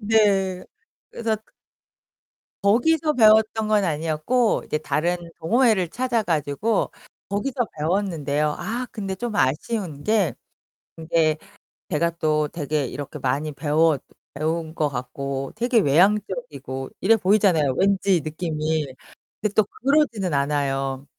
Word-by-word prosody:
네. 200 -4 +2 0.5
그래서 225 -1 -1 1.3
거기서 300 +10 +3
배웠던 220 -3 +4
건 210 -2 +3
아니었고 165 +9 +1
이제 150 - -1
다른 155 +4 0 0.2
동호회를 215 0 +2
찾아 240 +3 0
가지고 165 +7 0 0.4
거기서 245 +5 -1
배웠는데요. 150 -4 0
아 230 +8 -3
근데 195 -4 -4
좀 215 +2 -4
아쉬운 150 - -1
게 205 - +1 0.6
이제 160 -1 +1 0.5
제가 170 0 +1
또 155 -2 0
되게 150 -2 -2
이렇게 145 +3 -6
많이 140 +4 -1
배웠 150 0 +2 0.3
배운 160 +2 -2
것 155 -2 0
같고 135 +1 -4
되게 240 +1 +3
외향적이고 185 - +1
이래 225 +4 +5
보이잖아요, 185 -8 +3
왠지 195 -2 +2
느낌이. 155 0 -2 0.6
근데 210 -1 -1
또 215 - +4
그러지는 240 - 0
않아요. 140 -1 -1
170 Hz, 260 characters per minute, -23 LUFS, 150-215 Hz, 1.3 s, 이래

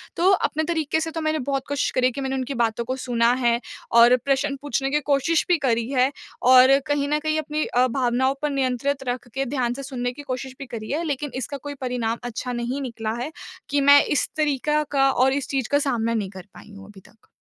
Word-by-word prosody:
तो 355 +3 +3
अपने 315 -4 +1
तरीके 315 -2 -1
से 325 0 -3
तो 325 0 -4
मैंने 310 0 0
बहुत 275 +1 -2
कोशिश 285 -1 -1
करी 255 0 +3
कि 275 - -6
मैंने 265 0 -2
उनकी 260 +1 -3
बातों 235 -2 0
को 255 - -2
सुना 240 -2 +1
है 235 0 +3 0.3
और 235 +1 +7
प्रश्न 275 +1 +1
पूछने 270 -1 -1
की 295 - +2
कोशिश 290 +4 +2
भी 355 - +3
करी 230 0 0
है। 260 0 +2 0.3
और 255 +2 +7
कहीं 290 -1 0
न 300 +1 +1
कहीं 310 0 -1
अपनी 305 0 -2
अ, 250 +1 +2
भावनाओं 255 +1 +1
पर 300 - 0
नियंत्रित 270 0 -1
रख 245 0 -3
के 270 0 -1
ध्यान 250 -2 -1
से 275 +2 -7
सुनने 245 -2 -3
की 290 - -10
कोशिश 260 -1 -5
भी 275 - -6
करी 225 -3 -7
है। 310 +4 -1
लेकिन 290 -2 -3
इसका 260 +2 -4
कोई 285 +2 -7
परिणाम 240 -3 -2
अच्छा 245 +1 -4
नहीं 245 +4 -3
निकला 225 -4 -4
है 300 +6 -4 0.4
कि 285 0 +1
मैं 285 +1 +7
इस 295 - 0
तरीक़ा 300 0 +1
का 275 -1 +3
और 265 +1 +3
इस 280 0 -2
चीज़ 265 -4 -2
का 285 - +4
सामना 230 -5 0
नहीं 210 -4 -2
कर 190 -1 -11
पाई 180 - -14
हूँ 195 - -11
अभी 205 -2 -14
तक। 225 - -25
265 Hz, 230 wpm, -23 LUFS, 245-285 Hz, 0.4 s, और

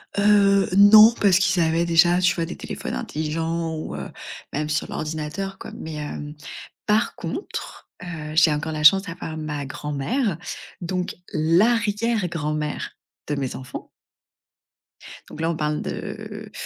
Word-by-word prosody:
Heu, 200 -1 +4
non, 215 +3 +9
parce 195 -3 +5
qu'ils 185 -2 +2
avaient 165 +1 +2
déjà, 175 +1 +4
tu 180 - +3
vois, 165 -2 -1
des - - -7
téléphones - - -5
intelligents 160 +2 -2
ou, 155 - -5
heu, - - -6 0.4
même 150 +1 -2
sur 150 - -1
l'ordinateur, 160 +5 -4
quoi, - - -8
mais, 160 -1 -7
hem, 150 0 -6 0.5
par 215 +2 +2
contre, - - -6
heu, 155 -3 -6
j'ai 160 -1 +6
encore 150 +2 -3
la 155 -1 -3
chance 195 +6 +7
d'avoir 165 -3 -6
ma 150 -2 -4
grand-mère, 150 - -2 0.4
donc 180 +1 -3 0.2
l'arrière-grand-mère 175 -4 +1 0.4
de 145 - -1
mes 135 -2 -3
enfants 130 -1 -8 1.4
donc 160 - -8
là, 165 - +1
on 170 - -1
parle 150 -1 -1
de - - -6
165 Hz, 140 wpm, -23 LUFS, 150-195 Hz, 1.4 s, non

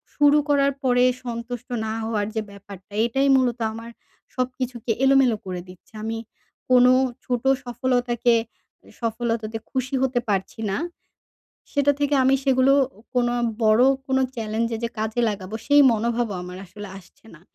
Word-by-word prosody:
শুরু 290 0 +5
করার 280 -1 +3
পরে 245 -1 +3 0.2
সন্তুষ্ট 235 0 -6 0.2
না 220 - -2
হওয়ার 220 -2 -1
যে 220 - 0
ব্যাপারটা, 200 -1 -13
এটাই 270 +4 +1
মূলত 250 -2 +1
আমার 230 +1 -8 0.4
সবকিছুকে 255 -2 -3
এলোমেলো 270 -4 +4
করে 180 -1 -4
দিচ্ছে। 180 +4 -16
আমি 225 +1 -3 0.5
কোনো 250 0 +6 0.3
ছোটো 250 +1 0 0.2
সফলতাকে 245 -1 +1 0.5
এ - - -16
সফলতাতে 230 -1 -2
খুশি 260 0 -2
হতে 260 -2 +1
পারছি 195 +2 -2
না। 195 - -1 1.0
সেটা 285 0 +3
থেকে 290 0 +1
আমি 265 - +4
সেগুলো 265 0 +4 0.4
কোনো 240 -1 +2 0.3
বড় 215 +2 +5 0.2
কোনো 265 0 +1 0.2
চ্যালেঞ্জে 225 +1 -2
যে - - 0
কাজে 220 +2 -1
লাগাবো 200 0 -5
সেই 290 0 +6
মনোভাবও 230 -1 -1
আমার 180 0 -8
আসলে 205 +3 -10
আসছে 185 +4 -21
না। 160 - -16
240 Hz, 145 wpm, -23 LUFS, 220-260 Hz, 1.0 s, কোনো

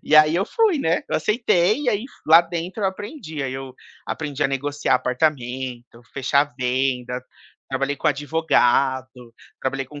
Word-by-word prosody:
E 155 - +4
aí, 155 +1 +6
eu 190 - +2
fui, 430 -9 +2
né, 165 -7 +1
eu - - +1
aceitei 215 +1 +2
e, - - +1
aí 215 +1 0
fu 215 - -12
lá 165 +1 +10
dentro 175 +4 -5
eu - - +3
aprendi, 190 - -7
aí, 130 -1 -3
eu 135 -1 -7 0.3
aprendi 150 -3 -3
a 135 - +3
negociar 145 +2 0
apartamento, 125 -3 -2
fechar 140 +1 +1
venda, 125 0 -1 0.5
trabalhei 135 +1 -1
com - - +1
advogado, 130 -5 +1 0.3
trabalhei 135 0 -2
com 145 +2 -11
145 Hz, 160 wpm, -22 LUFS, 130-165 Hz, 0.5 s, lá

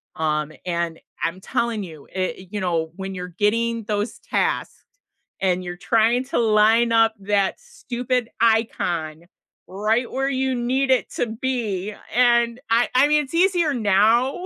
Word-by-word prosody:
um, 155 -2 -1
and 170 -2 -2 0.2
I'm 175 +3 -2
telling 225 +1 -2
you, 160 -6 -11
i 185 0 -3
you 205 - -4
know, 165 -4 -1
when 195 0 -6
you're 180 -1 -5
getting 225 +5 0
those 210 +1 -3
tasked - - -1 0.7
and 185 -1 +1
you're 175 0 -6
trying 230 +5 +2
to 275 - -3
line 225 +1 +4
up 225 -1 +4
that 200 -1 0
stupid 250 - -3
icon, 175 -8 0 0.4
right 215 +6 0
where 270 +1 -1
you 265 -1 0
need 255 +3 0
it 260 - +1
to - - -1
be 220 -4 -3 0.2
and 235 -1 +3
I 235 +1 +3
I 265 +3 +6
mean, 300 0 +3
it's 270 - -15
easier 345 -3 +3
now 225 - +2
225 Hz, 150 wpm, -22 LUFS, 190-245 Hz, 0.7 s, I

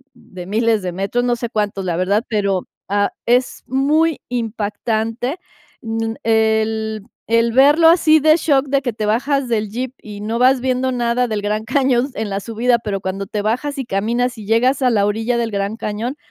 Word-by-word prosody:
de 180 -1 -11
miles 220 0 +1
de 180 -1 -3
metros, 195 +7 -1
no 245 -1 +1
sé 235 -1 -5
cuántos, 205 -3 -2
la 175 - -1
verdad, 200 +6 +1
pero, 200 -4 -1 0.2
ah, 205 0 +1 0.2
es 245 +1 +1
muy 300 +4 +2
impactante, 225 - -2 0.5
n 225 0 -2
el 220 -1 +1 0.2
el 230 +1 +2
verlo 295 +5 +6
así 320 -2 +5
de 310 +1 +5
shock 285 -4 +2
de 275 0 +1
que 245 -2 -2
te 215 -1 -4
bajas 265 +5 0
del 215 -3 -1
Jeep 250 +4 -4
y 205 -1 -9
no 225 +3 -2
vas 255 +1 +4
viendo 260 0 0
nada 245 0 0
del 215 -3 -2
Gran 210 +1 -1
Cañón 260 +1 +1
en 220 -2 -3
la 195 - -2
subida, 235 +2 +1
pero 200 -3 -3
cuando 195 +1 -4
te 210 +1 -3
bajas 255 +7 -2
y 265 - -3
caminas 235 +4 -1
y 215 - -9
llegas 250 +6 +2
a 255 - +4
la 205 -4 +2
orilla 225 +3 0
del 230 -1 -1
Gran 200 +2 -2
Cañón, 230 +6 -4
230 Hz, 190 wpm, -19 LUFS, 210-255 Hz, 0.5 s, verlo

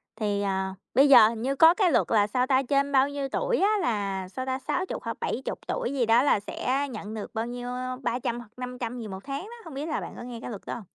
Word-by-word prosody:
thì, 205 -2 -1
ờ, 190 -1 -1 0.2
bây 275 +2 +6
giờ 240 -5 +9
hình 225 -1 -5
như 270 +3 0
có 320 +4 +7
cái 365 -3 +2
luật - - +2
là 210 -2 +4
sao 250 +4 0
ta? 260 -1 +4
Trên 280 +2 +1
bao 270 +1 +4
nhiêu 280 -1 -3
tuổi 485 - 0
á 395 - +4
là 195 -4 -1
sao 260 +7 -5
ta? 260 0 -2
60 365 +7 -3
hoặc - - -4
là - - -6
70 265 - -3
tuổi 250 - -2
gì 260 -4 +1
đó 230 +3 +5
là 280 - +3
sẽ 260 +7 -2
nhận 215 -1 -6
được 215 - -6
bao 225 0 -1
nhiêu, 245 0 -5
ơ, 255 0 -4
300 240 0 -1
hoặc 240 -3 -12
500 250 -1 -5
gì 225 - -6
một 190 -1 -8
tháng 275 0 -4
đó, 450 +4 -10
hông 325 - -9
biết 280 +3 -4
là 310 - -1
bạn - - -7
có - - -7
nghe 240 -1 -7
cái - - -6
luật 205 -4 -7
đó - - -4
hông? 230 - -8
250 Hz, 280 wpm, -27 LUFS, 220-275 Hz, 0.2 s, giờ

